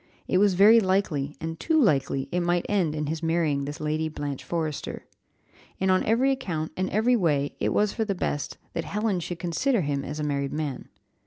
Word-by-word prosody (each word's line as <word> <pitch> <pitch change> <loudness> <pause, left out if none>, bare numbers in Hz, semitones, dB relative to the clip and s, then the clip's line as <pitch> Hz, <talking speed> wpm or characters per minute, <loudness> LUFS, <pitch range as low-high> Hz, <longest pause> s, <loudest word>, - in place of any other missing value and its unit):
It 185 - +2
was 200 -2 +4
very 210 +5 +7
likely, 185 -8 0
and 165 0 -5
too 320 -1 +2
likely, 135 - +2
it 180 - +1
might 175 0 +1
end 180 -7 +1
in 150 0 -2
his 155 +2 -3
marrying 160 -4 +1
this 145 +1 -6
Lady 155 +1 -1
Blanche 145 -3 -5
Forrester. 160 -4 -4 0.7
And, 190 0 +2
on 185 - +3
every 250 +5 +3
account, 175 -12 -3
and 185 0 -1
every 225 +4 +3
way, 150 -9 +1
it - - +1
was 210 -1 +1
for 225 - -1
the 200 -3 -2
best 145 -4 -3 0.2
that 165 - -2
Helen 210 -1 -1
should 175 0 -5
consider 185 +8 0
him 140 -3 -1
as 150 +2 -5
a - - -2
married 140 -2 -1
man. 150 -4 -4
165 Hz, 200 wpm, -26 LUFS, 150-200 Hz, 0.7 s, very